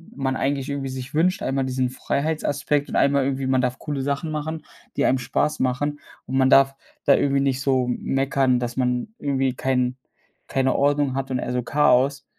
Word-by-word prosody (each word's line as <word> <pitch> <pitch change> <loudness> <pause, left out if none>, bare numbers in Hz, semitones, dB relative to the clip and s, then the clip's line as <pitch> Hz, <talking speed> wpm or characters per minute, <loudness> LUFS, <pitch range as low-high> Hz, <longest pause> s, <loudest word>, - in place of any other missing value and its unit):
man 135 -1 -1
eigentlich 140 0 -1
irgendwie 140 -1 -3
sich 130 +2 -7
wünscht, 180 +5 +2
einmal 135 0 0
diesen 130 -1 -1
Freiheitsaspekt 145 +1 -1
und - - -5
einmal 140 -1 +3
irgendwie, 135 -1 -1
man 130 -1 +2
darf 125 0 -2
coole 145 -3 -3
Sachen 140 +3 -2
machen, 155 +1 -4 0.3
die - - +2
einem 130 - +3
Spaß 150 +4 -1
machen 145 +3 -1 0.3
und 130 +1 -1
man 130 0 +4
darf 135 0 +5 0.3
da 140 - +6
irgendwie 140 -1 +1
nicht 135 -1 0
so 130 -2 +2
m 125 - -1
meckern, 135 -2 +1
dass 120 0 -4
man 125 +4 0
irgendwie 135 -2 0
kein 125 -1 0 0.5
keine 130 -1 +1
Ordnung 145 -1 +2
hat 135 0 -3
und 125 - 0
eher - - -3
so 125 0 0
Chaos. 140 +1 +2
135 Hz, 195 wpm, -23 LUFS, 130-140 Hz, 0.5 s, da